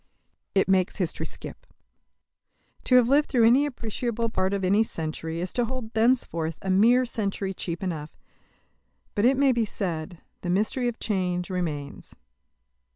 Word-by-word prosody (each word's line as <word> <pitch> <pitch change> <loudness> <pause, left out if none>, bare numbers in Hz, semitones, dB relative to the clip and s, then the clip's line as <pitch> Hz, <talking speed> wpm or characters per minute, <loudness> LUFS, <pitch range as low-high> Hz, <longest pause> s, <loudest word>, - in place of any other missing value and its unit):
It 195 - +3
makes 190 -1 +2
history 180 -5 -2
skip. - - -10 1.2
To 255 - +4
have 250 -2 +6
lived 285 +3 +3
through 240 -4 +4
any 260 +6 +5
appreciable 230 -2 -3
part 190 -3 0
of 200 -1 -1
any 200 +4 +4
century 160 -4 -3
is 180 +1 -3
to 245 - +1
hold 235 -2 -6
thenceforth 220 -9 +1
a 190 - 0
mere 235 +7 +5
century 200 -4 -3
cheap 175 -1 -4
enough. 160 -5 -3 1.0
But, 205 - +1
it 260 +2 +4
may 275 -1 +4
be 235 -2 +1
said, 175 -5 -4 0.2
the 175 - -4
mystery 215 +7 +1
of 240 - -3
change 180 -4 -1
remains. 155 -6 -4
200 Hz, 155 wpm, -26 LUFS, 180-235 Hz, 1.2 s, have